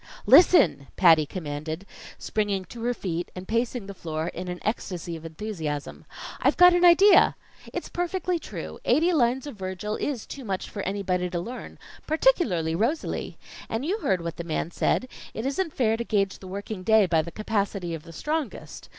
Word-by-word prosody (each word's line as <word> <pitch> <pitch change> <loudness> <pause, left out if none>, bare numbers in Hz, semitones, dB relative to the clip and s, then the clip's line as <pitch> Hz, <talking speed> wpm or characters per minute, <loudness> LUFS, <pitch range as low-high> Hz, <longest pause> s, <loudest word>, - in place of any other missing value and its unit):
"Listen!" 170 - +6
Patty 160 -5 +5
commanded, 155 +1 -5 0.3
springing 205 -3 -1
to 230 +6 -10
her 245 - +1
feet 175 -4 -3
and 180 0 -8
pacing 230 0 -1
the 200 - -7
floor 160 -2 -4
in 180 +2 -6
an 180 0 -4
ecstasy 180 -6 -3
of 160 - -9
enthusiasm. 160 -5 -5 0.4
"I've - - +3
got 360 0 +8
an 355 0 +2
idea! 360 +4 +7 0.4
It's - - -4
perfectly 355 0 -2
true. - - -7
Eighty 340 +3 +3
lines 255 -2 +2
of 285 -7 -8
Virgil 190 +3 -4
is 270 -6 -3
too 275 - -8
much 195 -4 -4
for 205 - -4
anybody 185 -2 -1
to 175 -1 -2
learn 240 +8 -7 0.3
particularly 300 - +2
Rosalie. 235 - -2 0.3
And 225 +5 -2
you 395 +7 -1
heard 190 - 0
what 170 -1 -5
the 170 - -4
man 165 0 -2
said: 255 - 0 0.3
it 220 - -4
isn't 310 +5 -1
fair 225 -3 +2
to 235 - -2
gage 200 -4 0
the 190 - -10
working 200 +1 -6
day 220 +2 +5
by 165 -3 +2
the 165 - -7
capacity 200 -3 -2
of 165 - -5
the 165 - -13
strongest. 300 - -4
200 Hz, 180 wpm, -26 LUFS, 175-255 Hz, 0.4 s, got